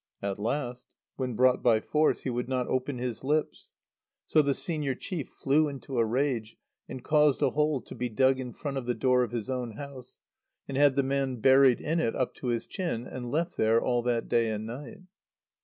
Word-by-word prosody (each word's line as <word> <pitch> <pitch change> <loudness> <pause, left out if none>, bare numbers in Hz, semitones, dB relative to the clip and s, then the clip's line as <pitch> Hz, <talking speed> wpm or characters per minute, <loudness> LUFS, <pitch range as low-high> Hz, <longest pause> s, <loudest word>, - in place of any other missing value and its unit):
At 100 0 -2
last, 125 +2 -3 0.3
when 125 -3 -3
brought 130 +2 +4
by 115 -3 +4
force, 155 +6 +1
he 130 - -3
would 125 +1 -3
not 130 -1 0
open 130 +1 -1
his 120 -1 -4
lips. 150 +3 -1 0.5
So 155 - +4
the 140 -2 +1
senior 150 -6 -2
chief 165 -1 -5
flew 150 +3 +2
into 135 -3 -4
a - - +5
rage, 120 -2 -1 0.3
and 130 - -7
caused 150 -2 +3
a - - +3
hole 150 -3 +1
to - - -11
be 125 - -3
dug 130 +3 +3
in 125 -2 -5
front 140 +2 -5
of 125 -2 -4
the 125 - 0
door 125 +3 +3
of 125 - 0
his 115 -3 -3
own 125 -3 -3
house, 130 0 -9 0.5
and 135 - -5
had 140 -1 +4
the 140 - +2
man 135 -1 -1
buried 130 +1 +5
in 165 +3 0
it 115 -8 0
up 130 - -1
to 130 - -5
his 120 -1 -1
chin, 165 - -3
and 125 -2 -6
left 170 +5 -1
there 110 +1 +4
all 120 0 0
that 120 -1 -1
day 115 -1 +2
and 110 0 -3
night. 145 - -8
130 Hz, 210 wpm, -28 LUFS, 120-140 Hz, 0.5 s, a